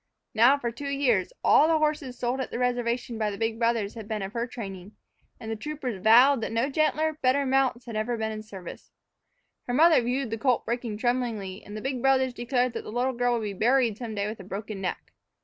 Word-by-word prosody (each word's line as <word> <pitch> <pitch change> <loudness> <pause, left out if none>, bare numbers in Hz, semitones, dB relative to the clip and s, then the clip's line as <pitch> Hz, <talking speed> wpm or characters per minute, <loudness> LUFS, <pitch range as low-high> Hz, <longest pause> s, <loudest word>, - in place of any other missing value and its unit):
Now, 240 +6 +5
for 240 -4 -3
two 280 +5 -6
years, 255 -9 +1
all 305 - +6
the 325 -1 +3
horses 300 -5 -1
sold 245 +2 -1
at - - -4
the - - -5
reservation 245 -1 -1
by 215 -1 +1
the 200 - -6
big 225 +1 -2
brothers 230 -3 0
had 220 -3 -9
been 215 -2 -3
of 195 +2 -6
her 235 0 -2
training, 200 -5 -8 0.5
and 225 - -6
the - - -1
troopers 255 -5 -5
vowed 245 +5 +6
that - - -3
no 230 +5 0
gentler, 310 +1 +1
better 270 +2 +2
mounts 260 -2 +1
had 230 -3 -7
ever 225 +2 -1
been 220 0 -2
in 215 - -5
the - - -9
service. 195 -5 -10 0.8
Her 245 - -1
mother 320 0 +6
viewed 245 0 -2
the 225 - -3
colt 250 -1 +1
breaking 235 -2 -3
tremblingly, 225 -5 -2
and 210 +1 -8
the - - -6
big 260 -1 -3
brothers 265 -1 +3
declared 245 0 0
that - - -4
the - - -8
little 250 +3 0
girl 245 0 +1
would 230 -2 -1
be 205 -1 -3
buried 230 +1 +2
some 230 -3 -5
day 200 0 -1
with 215 0 -6
a - - -8
broken 200 +1 -6
neck. 180 - -5
240 Hz, 235 wpm, -27 LUFS, 215-260 Hz, 0.8 s, all